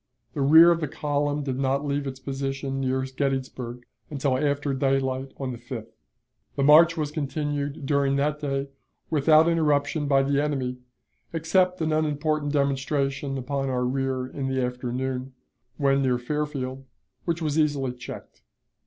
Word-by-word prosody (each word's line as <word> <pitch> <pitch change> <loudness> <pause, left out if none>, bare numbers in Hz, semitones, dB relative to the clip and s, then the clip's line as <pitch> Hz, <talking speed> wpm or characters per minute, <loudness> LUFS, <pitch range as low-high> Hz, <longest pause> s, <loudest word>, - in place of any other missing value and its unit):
The 145 - -3
rear 160 +5 +8
of 170 -1 +1
the 155 - -1
column 145 +1 -1
did 130 -2 -3
not 135 +1 0
leave 140 0 -1
its 135 0 -6
position 135 0 -3
near 130 0 0
Gettysburg 130 -2 -3 0.2
until 140 -2 0
after 145 +1 0
daylight 135 0 0
on 135 -2 -3
the 120 - -7
5th. 120 -2 -7 0.6
The 140 - 0
march 165 +4 +7
was 150 -2 -1
continued 145 -1 -3
during 140 -1 +2
that 150 +2 0
day 135 -1 -2 0.4
without 155 +1 +5
interruption 150 -2 +1
by 135 -1 +4
the 140 +1 +1
enemy, 135 -4 -2 0.6
except 180 +2 +1
an 155 -1 +1
unimportant 150 -1 0
demonstration 140 -1 0
upon 135 +1 -2
our 125 -1 0
rear 130 0 -1
in 135 +1 -4
the 130 0 -1
afternoon, 125 +1 -3 0.4
when 140 -1 +2
near 130 -2 +2
Fairfield, 135 0 -3 0.4
which 170 -1 -1
was 155 0 0
easily 140 -4 +1
checked. 125 -1 -10
140 Hz, 150 wpm, -25 LUFS, 130-150 Hz, 0.6 s, rear